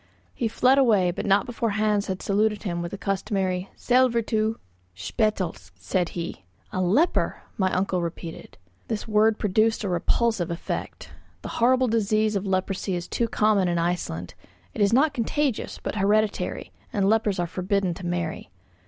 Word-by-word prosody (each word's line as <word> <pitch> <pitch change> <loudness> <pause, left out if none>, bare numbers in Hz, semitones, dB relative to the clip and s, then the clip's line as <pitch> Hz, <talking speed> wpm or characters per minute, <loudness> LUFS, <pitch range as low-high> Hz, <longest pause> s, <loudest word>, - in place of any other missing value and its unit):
He 235 - -1
fled 255 +4 +3
away, 205 -9 +4
but 190 - -4
not 195 0 +4
before 235 -1 -2
Hans 210 -1 +1
had 190 -2 -4
saluted 210 +1 +1
him 175 -4 -2
with 170 - -4
the 200 - -6
customary 195 -2 -1
"Sællvertu." 230 -3 +2 0.4
"Spetelsk," 165 - -2
said 95 - -1
he. 170 - -5 0.3
"A 185 - 0
leper!" 225 - +1
my 190 -4 +1
uncle 185 -1 0
repeated. 170 -1 -7 0.3
This 220 0 -3
word 215 0 +3
produced 215 +3 +1
a 200 - -1
repulsive 185 +2 +1
effect. 170 - -5 0.3
The - - -5
horrible 255 +2 +4
disease 215 -1 +1
of 195 0 -2
leprosy 190 0 -1
is 175 0 -4
too 235 - 0
common 210 -4 +2
in 175 -1 0
Iceland; 165 - -2 0.4
it - - -4
is 200 0 +4
not 275 +5 +4
contagious, 270 +1 -1
but - - -3
hereditary, 210 +1 0 0.2
and 200 -5 +1
lepers 215 -2 +2
are 175 - 0
forbidden 185 +1 -1
to 185 - -10
marry. 175 -6 -3
200 Hz, 160 wpm, -25 LUFS, 180-220 Hz, 0.4 s, away